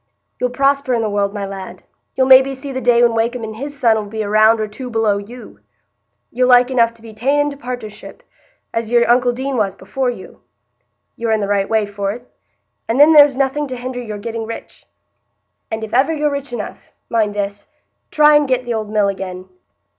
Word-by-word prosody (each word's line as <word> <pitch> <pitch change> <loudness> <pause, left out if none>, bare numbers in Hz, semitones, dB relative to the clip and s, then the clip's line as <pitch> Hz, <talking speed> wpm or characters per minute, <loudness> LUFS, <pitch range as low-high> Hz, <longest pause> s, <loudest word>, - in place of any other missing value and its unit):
You'll 250 - 0
prosper 275 0 +1
i' - - 0
the 220 -2 -1
world, 200 -1 0
my 205 -1 -4
lad; 195 -1 -8 0.3
you'll 260 - +2
maybe 265 +1 +6
see 275 +1 -8
the 260 0 -4
day 240 0 +4
when 235 -1 +4
Wakem 230 +1 -1
and 220 0 -6
his 285 +4 -7
son 225 -3 +3
'ull 215 - -3
be 220 +1 -4
a 205 - -5
round 215 +2 +4
or 215 - -1
two 250 +5 -8
below 220 -3 +1
you. 235 +5 -12 0.7
You'll 250 +1 +1
like 250 0 +5
enough 230 -2 +1
be 225 -1 -12
ta'en 270 +7 0
into 290 -1 -2
partnership, 245 - -8 0.5
as 230 -1 -2
your 240 0 +3
uncle 245 +1 +3
Deane 260 +2 -3
was 200 -3 0
before 265 +3 -3
you,—you're 120 - -10
in 220 - +2
the 200 - -2
right 200 -1 0
way 220 -1 +2
for't; 205 +3 -4 0.6
and 230 +4 0
then 300 +2 +7
there's 290 -3 +7
nothing 280 +2 0
to 260 - -5
hinder 250 0 -5
your 215 -3 -6
getting 225 +1 -5
rich. 230 - -9 0.8
And 220 0 -4
if 220 - -7
ever 265 +6 +3
you're 300 -2 0
rich 280 -2 -5
enough—mind 215 -1 -4
this—try 205 +8 0
and 295 -1 +3
get 255 -1 0
th' 240 - -2
old 215 -2 -3
mill 210 -1 +1
again." 185 -1 -5
230 Hz, 200 wpm, -18 LUFS, 210-260 Hz, 0.8 s, then